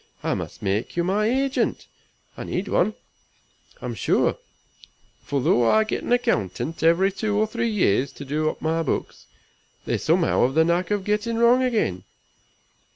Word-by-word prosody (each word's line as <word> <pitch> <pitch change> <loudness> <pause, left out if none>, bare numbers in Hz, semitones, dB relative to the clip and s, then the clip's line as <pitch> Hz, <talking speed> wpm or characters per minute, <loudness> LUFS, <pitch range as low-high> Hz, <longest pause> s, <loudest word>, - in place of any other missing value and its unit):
I - - 0
must - - -6
make 100 - -2
you 170 - +2
my 200 +4 +1
agent. 270 +3 0 0.5
I - - -6
need 190 +3 -3
one, 210 +4 +1 0.9
I'm - - -3
sure; - - +1 0.8
for 140 -2 -2
though 120 -2 +3
I 220 - +4
get 215 - -3
an - - -5
accountant 160 - 0
every 170 +4 +3
two 205 +1 -2
or 215 - +3
three 230 +1 -2
years 140 - +1
to 145 - -9
do 155 +3 0
up - - -8
my 160 +1 0
books, 160 - -4 0.6
they - - -1
somehow 165 +1 +2
have 135 - -6
the 160 0 +4
knack 170 +2 0
of 205 -2 -1
getting 210 +3 -1
wrong 235 +2 +5
again. 220 - 0
185 Hz, 165 wpm, -23 LUFS, 155-220 Hz, 0.9 s, wrong